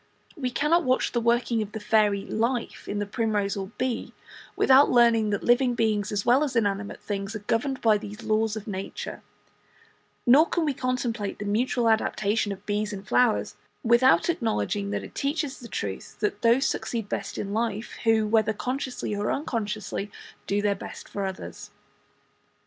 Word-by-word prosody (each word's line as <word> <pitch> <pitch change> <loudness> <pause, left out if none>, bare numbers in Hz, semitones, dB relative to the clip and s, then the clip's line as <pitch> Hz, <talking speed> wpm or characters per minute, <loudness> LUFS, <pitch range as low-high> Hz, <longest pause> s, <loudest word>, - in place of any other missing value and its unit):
We 265 -6 -2
cannot 300 +8 +2
watch 255 0 +1
the 240 - 0
working 235 0 +2
of 210 -1 -5
the 220 - -4
fairy 210 -2 +2
"life" 235 +2 -2
in 205 - -2
the 205 - -1
primrose 210 -2 -1
or 195 -1 -4
the - - -17
bee, 255 -2 -2 0.4
without 270 +2 +6
learning 235 -3 +4
that 205 -1 -1
living 245 0 +3
beings 215 -3 0
as 205 -1 -1
well 255 +5 +5
as 275 -4 -2
inanimate 200 -3 0
things 200 +1 -4
are 210 -1 -7
governed 260 +5 0
by 215 -2 +4
these 210 0 -8
same - - -10
laws 220 0 +2
of 215 - -6
nature; 195 -2 -6 1.0
nor 280 +6 +6
can 340 -2 0
we 290 - +1
contemplate 245 -5 -2
the 205 - -5
mutual 235 +3 +1
adaptation 215 -1 +1
of 195 +1 -8
bees 210 +1 -1
and 200 0 -7
flowers 245 -1 +2 0.3
without 240 +2 +5
acknowledging 220 -9 -1
that - - -2
it - - -10
teaches 285 0 -2
the 235 - -9
truth 100 - -5
that 210 -1 -1
those 235 +4 +4
succeed 225 -4 -2
best - - -4
in 200 0 -3
life 225 0 -2
who, 225 -1 +3
whether 220 0 +2
consciously 250 -1 -3
or 205 +1 -1
unconsciously, 215 -6 -3 0.4
do 205 +1 0
their 205 -1 +3
best 195 - -9
for 200 -1 -3
others. 190 0 -7
220 Hz, 175 wpm, -26 LUFS, 205-245 Hz, 1.0 s, without